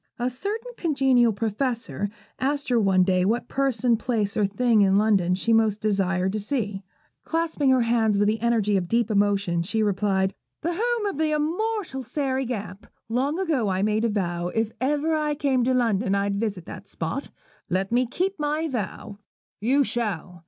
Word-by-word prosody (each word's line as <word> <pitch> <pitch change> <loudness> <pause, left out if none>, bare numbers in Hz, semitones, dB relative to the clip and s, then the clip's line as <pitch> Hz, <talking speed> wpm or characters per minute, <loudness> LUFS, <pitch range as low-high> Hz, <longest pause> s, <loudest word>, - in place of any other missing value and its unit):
A 245 +1 -1
certain 430 - -4
congenial 265 -7 +3
Professor 220 -1 -2 0.3
asked 285 +1 -1
her 245 -2 +3
one 190 -3 +4
day 185 -1 +2
what 225 +6 0
person, 250 -4 +1
place, 220 -3 -1
or 210 -2 +2
thing 225 +2 +2
in 195 -1 +4
London 200 -4 +3
she 225 +5 0
most 220 -2 +3
desired 190 -3 0
to 215 - -1
see. 210 -3 -2 0.4
Clasping 325 -4 0
her 260 -1 +4
hands 225 -3 +2
with 205 +1 +3
the 220 +1 +1
energy 225 -3 +1
of 180 -2 -2
deep 230 +2 +1
emotion, 200 -4 +1
she 215 +6 0
replied, 195 -1 +1 0.3
'The 340 +2 -1
home 465 +3 0
of 395 -8 -3
the 315 -1 +2
immortal 340 0 -1
Sairy 265 0 -2
Gamp. 205 -4 -6 0.2
Long 265 +7 0
ago 310 - 0
I 190 +1 0
made 215 +1 +1
a 230 - +2
vow, 175 -4 -1
if 225 +4 -1
I - - +2
ever 300 +1 0
came 270 -4 +1
to 260 - +2
London 225 -4 +1
I'd 200 0 0
visit 200 -6 -3
that - - -9
spot. - - -4 0.4
Let 190 +2 -1
me 245 +1 +2
keep 370 +8 -2
my 300 +2 0
vow.' 210 -4 -5 0.4
'You 265 +7 +3
shall!' 200 -8 -3
230 Hz, 180 wpm, -25 LUFS, 200-275 Hz, 0.4 s, one